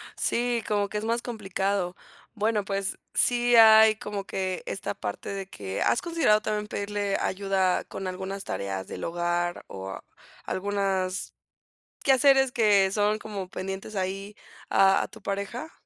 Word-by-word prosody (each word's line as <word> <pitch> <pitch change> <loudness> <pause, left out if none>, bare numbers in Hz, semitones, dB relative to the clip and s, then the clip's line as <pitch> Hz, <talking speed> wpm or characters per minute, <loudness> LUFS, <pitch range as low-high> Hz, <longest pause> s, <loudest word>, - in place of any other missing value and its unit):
Sí, 240 -1 0
como 205 -1 0
que 210 - -3
es 210 - -3
más 230 +1 0
complicado. 195 -5 -2 0.4
Bueno, 215 -1 0
pues 195 0 -2 0.2
sí 245 0 +3
hay 220 -1 +8
como 205 -2 -5
que 185 -1 -3
esta 105 - -4
parte 100 - -5
de 195 -1 -5
que, 95 - -5
¿has - - +2
considerado 330 -11 +2
también 210 -1 -2
pedirle 205 -1 -2
ayuda 190 -1 +1
con 195 - -6
algunas 190 +2 -5
tareas 95 -1 -4
del - - -7
hogar, 175 +1 -1
o 95 0 -6 0.5
algunas 195 -1 -1 0.7
quehaceres 270 -1 +5
que 205 -5 +4
son 210 +1 +2
como 200 -4 -6
pendientes 195 +3 -6
ahí 195 +2 -3 0.3
a 195 0 +4
a - - -4
tu 220 -1 -15
pareja? 200 +10 -4
200 Hz, 145 wpm, -27 LUFS, 190-215 Hz, 0.7 s, hay